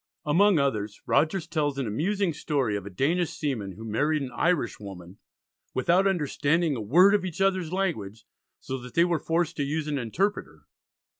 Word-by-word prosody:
Among 185 +5 +4
others, 110 -8 -1
Rogers 160 +5 +1
tells 145 -4 -1
an 135 - -1
amusing 175 - 0
story 140 -8 -1
of 100 -1 -5
a - - -5
Danish 160 - 0
seaman 115 -11 -3
who 110 +4 -10
married 145 +7 0
an 130 - -6
Irish 145 -1 0
woman, 95 -2 -10 0.6
"without 175 +9 +3
understanding 160 -2 +1
a 115 - -4
word 175 - +5
of 205 -3 +2
each 180 -2 -5
other's 190 -4 +1
language, 115 - -3 0.3
so 130 0 -5
that 125 0 -11
they 170 - +5
were 170 -3 0
forced 165 +1 -1
to 145 - 0
use 150 +2 -2
an 145 -2 -1
interpreter." 185 - -2
150 Hz, 175 wpm, -26 LUFS, 120-175 Hz, 0.6 s, word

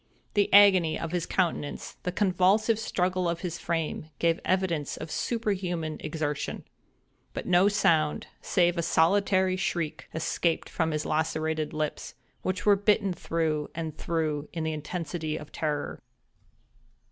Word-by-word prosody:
The 205 -1 +2
agony 190 -5 +6
of 165 - -4
his 175 -2 -1
countenance, 170 -5 -2
the 180 - -2
convulsive 200 +4 +3
struggle 180 -4 0
of 170 0 -3
his 170 -2 -4
frame, 165 -2 -2
gave 165 0 +2
evidence 180 -6 0
of 155 0 -7
superhuman 185 -9 -2
exertion: 150 -2 -3 0.7
but - - -4
no 180 +2 +5
sound, 165 -7 +2 0.2
save 175 -1 +2
a - - +3
solitary 185 +3 +3
shriek, 165 -4 -2
escaped 165 +1 0
from 160 -2 0
his 155 -1 -2
lacerated 160 0 -1
lips, 155 -1 -3 0.3
which 185 0 -2
were 205 -1 +6
bitten 200 -1 +2
through 160 -3 -1
and 160 -2 -4
through 155 -3 -2
in 165 -2 -3
the 160 0 -1
intensity 155 0 -4
of 150 -1 -10
terror. 150 -2 -3
170 Hz, 135 wpm, -28 LUFS, 155-185 Hz, 0.7 s, agony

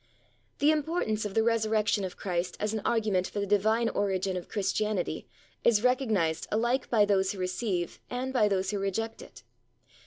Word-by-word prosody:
The 295 +2 +4
importance 300 -9 -1
of 205 - -5
the 225 - +4
Resurrection 220 -2 +1
of 185 - -5
Christ 180 -2 -2
as 210 +1 -1
an 220 - -2
argument 210 -5 +1
for 205 - -5
the 200 - 0
Divine 220 +3 +2
origin 190 -2 0
of 180 - -6
Christianity 210 -1 -1 0.4
is 225 -2 +4
recognised 220 - +1
alike 240 +4 +1
by 215 -3 +4
those 195 -1 +2
who - - -9
receive 185 -1 -2
and 255 +1 -3
by 225 -5 +4
those 195 -1 0
who 205 - -2
reject 225 +4 -2
it. - - -13
210 Hz, 175 wpm, -29 LUFS, 190-225 Hz, 0.4 s, The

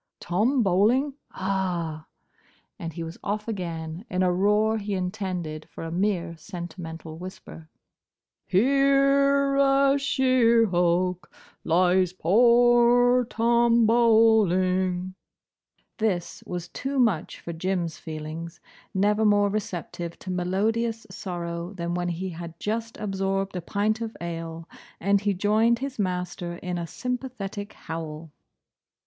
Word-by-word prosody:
"Tom 225 +9 +1
Bowling?—Ah!" 190 - 0 0.7
and 165 - -5
he 165 - -5
was 165 +1 -8
off 210 +2 -3
again, 170 -4 -4
in 185 0 0
a 180 -1 +2
roar 210 +4 +2
he 205 -1 -3
intended 180 -5 -4
for - - -9
a 165 - -5
mere 175 -2 -1
sentimental 165 -2 -8
whisper 180 -3 -10 0.8
"Here, 275 +4 +3
a 275 0 +4
sheer 255 -4 +3
hulk, 180 -1 0 0.3
lies 180 +2 +3
poor 240 +5 +5
Tom 235 0 +3
Bowling—" 190 -6 +3 0.9
This 195 -6 -1
was 175 -1 -4
too 275 +1 -4
much 220 -11 +1
for 170 - -6
Jim's 170 -1 -2
feelings, 160 +1 -7 0.4
never 210 +3 +2
more 205 -1 +4
receptive 175 -4 -4
to 185 - -7
melodious 220 +6 -1
sorrow 175 -1 -5
than 170 -2 -3
when 175 0 -1
he 180 +2 -3
had 170 -1 -8
just 225 +2 -3
absorbed 195 -1 -2
a 180 - -2
pint 210 +5 -1
of 225 -1 -5
ale, 165 -1 -6 0.3
and 200 +2 +2
he 205 -1 0
joined 215 +5 +3
his 270 -1 -5
master 180 -2 -2
in 180 0 -4
a 170 - -4
sympathetic 240 -4 -5
howl. 160 -1 -7
190 Hz, 120 wpm, -26 LUFS, 175-230 Hz, 0.9 s, poor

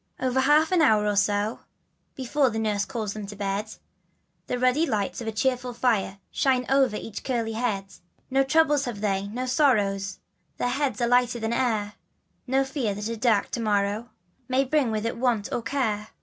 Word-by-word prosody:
NL 255 -1 0
Y 265 - +3
half 300 +4 +4
an 360 -3 +4
hour 215 -8 +4
or 210 -1 +1
so 205 +2 +1 0.6
Before 265 +1 +1
nurse 215 -2 -1
calls 220 -6 -4
them 210 -2 -6
to 205 - -8
bed, 200 +1 -2
And 215 - -13 0.8
the 250 - -1
ruddy 255 +6 +2
light 210 +2 -2
of 230 - -6
a - - 0
cheerful 250 +2 -1
fire 225 -5 0
Shines 255 -2 +1
over 265 -5 +3
each 215 -1 -6
curly 235 -4 -1
head. 220 -4 -1 0.5
No 270 +1 +4
trouble 295 +1 +3
have 245 -7 -4
they, 200 -1 0
no 245 +5 -4
sorrow 245 -8 +2 0.6
Their 245 - 0
hearts 265 -4 -1
are 240 - +2
lighter 245 0 +2
than 225 +1 -2
air, 220 -4 0 0.5
No 270 +2 +2
fear 265 -7 -2
that 210 +2 -4
a 230 - -2
dark 225 -3 +1
to - - -2
morrow 210 +1 0 0.4
May 260 +1 +2
bring 275 -2 +1
with 215 0 -2
it 230 - -2
want 235 -4 0
or - - -1
care. 225 -4 -1
235 Hz, 190 wpm, -26 LUFS, 210-260 Hz, 0.8 s, half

